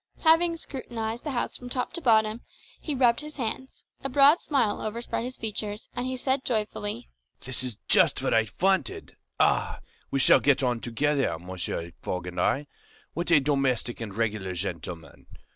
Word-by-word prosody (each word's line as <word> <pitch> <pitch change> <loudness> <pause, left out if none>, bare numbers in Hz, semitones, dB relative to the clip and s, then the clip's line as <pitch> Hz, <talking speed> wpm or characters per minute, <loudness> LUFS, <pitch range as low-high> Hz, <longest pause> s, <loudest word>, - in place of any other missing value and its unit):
Having 330 +1 +4
scrutinised 235 -6 -5
the 300 - -3
house 250 -4 -2
from 250 - -7
top 250 +3 -2
to 340 - -2
bottom, 220 -3 +3 0.4
he 300 - -4
rubbed 245 -1 +3
his 300 0 -9
hands, 260 +1 -4 0.2
a 270 - -2
broad 280 +5 +6
smile 270 -8 0
overspread 230 +2 -3
his 255 +1 -6
features, 210 -1 -4
and 245 +1 -3
he 260 0 -3
said 265 +1 0
joyfully, 210 - -3 0.3
"This 130 0 +1
is 125 -5 -3
just - - +4
what - - +1
I 110 -1 +3
wanted! 195 - 0 0.2
Ah, - - +2 0.3
we 135 - -1
shall - - +7
get 140 -1 +3
on 125 -2 +1
together, 135 +4 0
Mr. 85 -1 -4
Fogg 90 -1 -3
and 90 0 -3
I! 140 +4 +1 0.5
What 170 +1 -3
a 165 -3 +7
domestic 135 -4 0
and 110 -3 -5
regular 105 -4 -1
gentleman! 85 -2 -5
210 Hz, 170 wpm, -27 LUFS, -, 0.5 s, shall